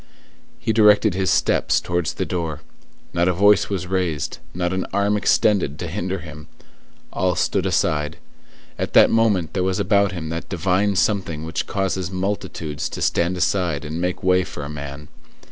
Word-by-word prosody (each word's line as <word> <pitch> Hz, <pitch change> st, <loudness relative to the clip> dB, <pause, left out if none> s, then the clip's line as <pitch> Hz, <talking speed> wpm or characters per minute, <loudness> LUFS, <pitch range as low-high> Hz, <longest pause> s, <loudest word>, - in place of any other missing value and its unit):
He 120 Hz, -2 st, -1 dB
directed 105 Hz, -2 st, +5 dB
his 95 Hz, -1 st, 0 dB
steps -, -, +2 dB
towards 85 Hz, -1 st, -2 dB
the -, -, -2 dB
door. 80 Hz, -4 st, -3 dB, 0.5 s
Not 85 Hz, 0 st, +2 dB
a 90 Hz, -, +3 dB
voice 100 Hz, +3 st, +4 dB
was 95 Hz, -3 st, -2 dB
raised, 90 Hz, -5 st, -2 dB
not 90 Hz, 0 st, -2 dB
an 95 Hz, -, -2 dB
arm 100 Hz, +1 st, +1 dB
extended 100 Hz, -7 st, +2 dB
to 85 Hz, -, -5 dB
hinder 95 Hz, +2 st, -3 dB
him. 80 Hz, -3 st, -10 dB, 0.7 s
All 90 Hz, -1 st, +1 dB
stood -, -, 0 dB
aside. 75 Hz, +1 st, 0 dB, 0.6 s
At -, -, -3 dB
that -, -, +7 dB
moment 105 Hz, -7 st, +2 dB
there 95 Hz, -, 0 dB
was 95 Hz, +2 st, 0 dB
about 100 Hz, 0 st, +2 dB
him 85 Hz, -4 st, -5 dB
that 80 Hz, +1 st, -5 dB
divine 95 Hz, +3 st, +1 dB
something 90 Hz, -6 st, 0 dB
which 80 Hz, +1 st, -3 dB
causes 95 Hz, -2 st, -1 dB
multitudes 95 Hz, -5 st, -3 dB
to -, -, -7 dB
stand 85 Hz, +2 st, +1 dB
aside 85 Hz, -5 st, 0 dB
and 80 Hz, +3 st, -4 dB
make 90 Hz, +2 st, -2 dB
way 95 Hz, 0 st, +3 dB
for 75 Hz, -5 st, -7 dB
a 70 Hz, -, -6 dB
man. 70 Hz, 0 st, -7 dB
90 Hz, 170 wpm, -22 LUFS, 80-95 Hz, 0.7 s, that